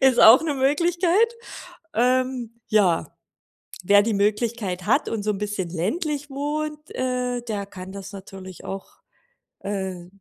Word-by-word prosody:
Ist 265 -2 +5
auch 230 +6 +9
'ne 310 -3 -1
Möglichkeit. 345 - +2 0.6
Ähm, 250 -1 0
ja, 190 -6 +3 0.8
wer 205 +2 +6
die 220 +1 0
Möglichkeit 205 -2 0
hat 275 +7 +2
und 220 -2 -2
so 215 - +1
'n 205 - -2
bisschen 205 -3 -3
ländlich 290 - -2
wohnt, 300 +2 -4
äh, 250 -1 -1
der 210 -4 -4
kann 185 -2 -9
das 195 0 -8
natürlich 190 -1 -10
auch, 195 0 -7 0.6
äh, 190 -3 -4
230 Hz, 135 wpm, -24 LUFS, 195-275 Hz, 0.8 s, auch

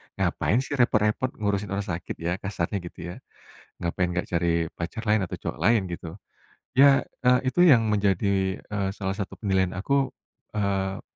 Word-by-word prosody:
"Ngapain 120 +5 +1
sih 140 +2 -4
repot-repot 115 +1 +2
ngurusin 100 -1 -1
orang 100 +1 -1
sakit 85 -2 -4
ya," 85 +1 0
kasarnya 100 -1 -3
gitu 85 - -10
ya. - - -8 0.6
"Ngapain 85 +1 -1
nggak 90 0 -2
cari 85 -1 +1
pacar 90 +7 -5
lain 105 -1 +3
atau 85 - -5
cowok - - -5
lain," 110 +2 +4
gitu. 85 0 -7 0.6
Ya, 140 0 +7 0.2
eee, 125 0 +6
itu 155 - -4
yang 115 -9 +6
menjadi, 100 -1 +1
eee, 100 -2 -2
salah 95 -2 -3
satu 100 -3 -4
penilaian 95 -3 +1
aku, 135 +8 0 0.4
eee, 100 -2 -1
100 Hz, 160 wpm, -26 LUFS, 90-110 Hz, 0.6 s, Ya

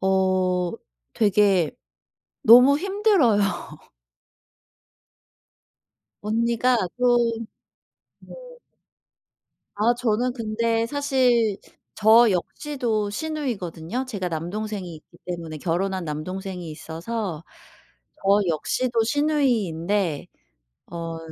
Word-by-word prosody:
어. 185 -2 +1 0.4
되게 200 -5 +3 0.7
너무 250 +5 +8
힘들어요. 385 - +2 2.8
언니가 235 +3 +1 0.2
그 250 - 0 1.2
네. - - -13 1.4
아 220 +4 +2
저는 245 +1 0
근데 230 0 -1
사실 250 -6 +1 0.4
저 220 +2 +6
역시도 220 - -2
시누이거든요. 240 - -4
제가 195 -8 -4
남동생이 180 +2 -5
있기 155 - -18
때문에 170 -3 -6
결혼한 185 +3 -2
남동생이 180 +3 -5
있어서 165 +2 -5 0.7
저 200 -1 +2
역시도 230 +8 0
시누이인데 210 - 0 0.6
어. 165 -1 -5
210 Hz, 175 characters per minute, -24 LUFS, 180-240 Hz, 2.8 s, 너무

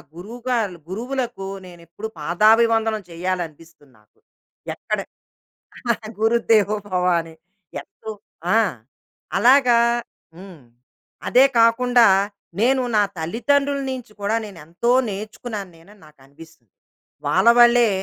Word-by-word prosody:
గురువుగలూ 225 0 -3
గురువులకు 240 -1 -4 0.2
నేను 175 -1 -13
ఎప్పుడు 205 +6 -7
పాదాభివందనం 220 +6 +3
చేయాలనిపిస్తుంది 165 -5 -6
నాకు. 105 - -33 0.6
ఎక్కడ - - -3 1.2
గురుదేవోభవని. 205 -7 +1 0.5
ఎంతో 220 - -13 0.5
ఆ! - - +5 0.8
అలాగా 250 -2 +5 0.6
హ్మ్. 185 -4 -12 0.7
అదే 260 +2 +6
కాకుండా, 240 0 +4 0.5
నేను 260 +2 +3
నా 210 - +4
తల్లిదండ్రుల 275 - 0
నుంచి 250 -4 -7
కూడా 210 +3 0
నేను 195 -4 -11
ఎంతో 175 +9 -3 0.2
నేర్చుకున్నాను 210 0 -6
నేను 165 +4 -20
అని 210 - -23
నాకనిపిస్తుంది. 140 - -18 0.6
వాళ్ళ 235 - +4
వల్లే, 240 -1 +6
215 Hz, 95 wpm, -21 LUFS, 175-235 Hz, 1.2 s, అదే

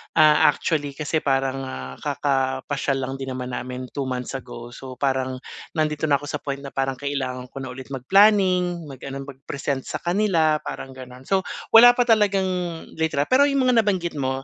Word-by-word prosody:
Ah, 150 -1 +6
actually 145 -1 -2
kasi 155 +1 -1
parang, 135 -1 0
ah, 65 - -6
kakapasyal 135 0 -1
lang 130 - -3
din 135 -1 -4
naman 125 0 -5
namin 125 0 -5
two 140 - -1
months 125 +1 -4
ago. 120 -2 -8
So, 130 -1 -9
parang 130 -2 0 0.4
nandito 155 -1 0
na 140 - +4
ako - - -9
sa 150 - -3
point 140 -1 -3
na 140 - -7
parang 135 -1 -1
kailangan 130 -3 -3
ko 135 - -7
na 130 - -6
ulit 130 0 -9
mag 130 -2 -5
planning 185 -4 +4
mag 135 -2 -10
ano 135 0 -5
mag-present 140 0 -4
sa - - -4
kanila 175 -5 +2
parang 135 - -6
gano'n. 130 0 -11
So, 195 -1 +3 0.3
wala 245 +2 +9
pa 245 - +3
talagang 210 -5 +3 0.6
litra 160 -3 +1
pero 280 +3 +5
yung 275 -2 +1
mga 240 -2 +5
nabanggit 180 -5 -1
mo, 135 0 -2
140 Hz, 185 wpm, -23 LUFS, 130-170 Hz, 0.6 s, wala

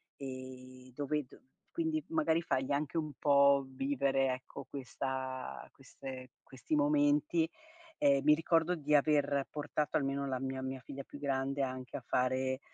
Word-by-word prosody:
e 130 -1 -9
dove 150 +1 -1
d - - -17 0.3
quindi 320 -2 -1
magari 300 - +2
fai 130 -4 -1
anche 150 +3 -1
un 155 -2 -2
po' 140 -1 +5
vivere 135 0 +1
ecco, 130 0 -8
questa 130 - -4
queste 130 -1 -9
questi 130 +3 -3
momenti. 150 +2 +3 0.5
Ehm, 140 -1 +4
mi 150 - +7
ricordo 165 +2 +2
di 150 -2 -1
aver 140 -2 +3
portato 150 0 -2
almeno 140 -1 -1
la 130 -1 -1
mia 130 0 -3
mia 130 0 -4
figlia 140 0 -7
più 145 - -11
grande 140 0 -1
anche 130 -1 -3
a 130 - -9
fare, 130 +1 +1
140 Hz, 145 wpm, -33 LUFS, 130-150 Hz, 0.5 s, mi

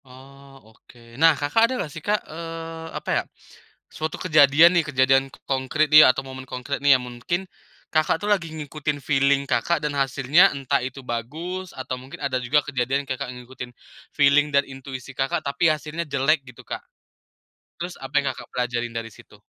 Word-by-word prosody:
Oh, 135 -2 -16
oke. 120 - -21 0.2
Nah 165 -2 +6
Kakak 185 +12 +2
ada - - -2
nggak, 155 -10 -4
sih, 155 - -8
Kak, 210 +5 -1
eee, 165 0 -7
apa, - - -7
ya, - - -13 0.6
suatu 155 0 -5
kejadian, 155 0 +6
nih, - - +5
kejadian 135 0 +3 0.2
konkrit, 135 +3 0
nih, 155 0 +10
atau 135 +1 0
momen 130 0 -8
konkrit, 125 +3 -4
nih, 140 -2 +6
yang 125 - -8
mungkin 125 +10 -3 0.5
Kakak, 155 0 +2
tuh, 205 - -1
lagi 170 -5 -2
ngikutin 150 -1 -4
feeling 140 0 +2
Kakak, 170 - +1
dan 150 - -1
hasilnya 140 +7 +4
entah 135 -2 0
itu 130 +2 -6
bagus, 160 +11 -5
atau 130 -1 -4
mungkin 130 +2 -11
ada 130 -2 -1
juga 140 +4 +2
kejadian 135 +1 -1
Kakak 130 -1 -4
ngikutin 125 0 -9 0.4
feeling 145 +1 +4
dan 140 -1 +2
intuisi 135 -1 -8
Kakak, 135 0 -1
tapi 140 +4 +2
hasilnya 155 +2 -2
jelek 140 +2 +2
gitu 125 - -13
Kak, - - -5 1.0
terus 175 +1 -5
apa 135 +1 -9
yang 140 -2 -1
Kakak - - -11
pelajarin 120 -1 -2
dari 115 0 -5
situ? 105 - -17
140 Hz, 175 wpm, -23 LUFS, 130-155 Hz, 1.0 s, nih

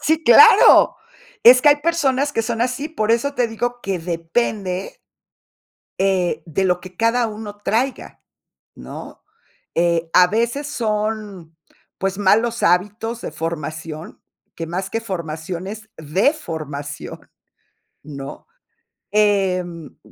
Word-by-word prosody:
Sí, 315 +2 +1
claro. 445 - +7 0.5
Es 250 +2 +8
que 295 - +6
hay 290 - +5
personas 290 -3 0
que 225 - 0
son 225 +1 -3
así, 255 +5 -1
por 225 -9 -2
eso 280 +5 +1
te 245 -3 +1
digo 245 +2 -3
que 195 -2 -2
depende 185 - -3 1.0
eh, 180 -5 +1
de 170 +4 -1
lo 180 -1 +1
que 185 0 -13
cada 230 +1 +2
uno 210 -1 -8
traiga, 230 +6 -2 0.6
¿no? - - -10 0.5
Eh, 170 -1 +1
a 180 - +7
veces 235 +8 -1
son, 210 - -3 0.4
pues, 195 0 -2
malos 225 +4 +2
hábitos 210 +6 0
de - - -6
formación, 155 0 -6 0.4
que 165 - -5
más 185 +3 -4
que 225 +3 -3
formación 170 -2 -5
es 220 +1 -8
deformación, 155 - -3 0.8
¿no? 140 -2 -9 0.6
Em, 185 -6 0
205 Hz, 120 wpm, -20 LUFS, 170-235 Hz, 1.0 s, Es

